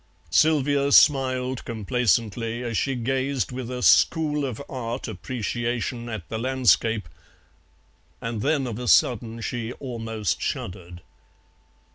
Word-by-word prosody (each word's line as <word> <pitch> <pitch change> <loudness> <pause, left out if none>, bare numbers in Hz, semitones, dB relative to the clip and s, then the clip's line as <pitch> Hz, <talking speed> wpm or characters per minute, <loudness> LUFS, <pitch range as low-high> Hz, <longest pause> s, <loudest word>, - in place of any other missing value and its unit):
Sylvia 145 - +3
smiled 130 -3 +4
complacently 115 0 -1
as 120 -2 -3
she 135 +4 0
gazed 130 +2 -1
with 125 -1 -5
a 125 -1 -4
School 150 -3 +4
of 125 -5 -5
Art 125 -1 -4
appreciation 120 +3 -3
at 110 -7 -6
the 110 - -4
landscape, 115 -5 +2 1.1
and 115 -2 -4
then 145 +1 +1
of 120 -2 -5
a 125 - -5
sudden 115 -1 +3
she 120 +1 -4
almost 115 - -3
shuddered. 90 -2 -5
120 Hz, 115 wpm, -24 LUFS, 115-130 Hz, 1.1 s, smiled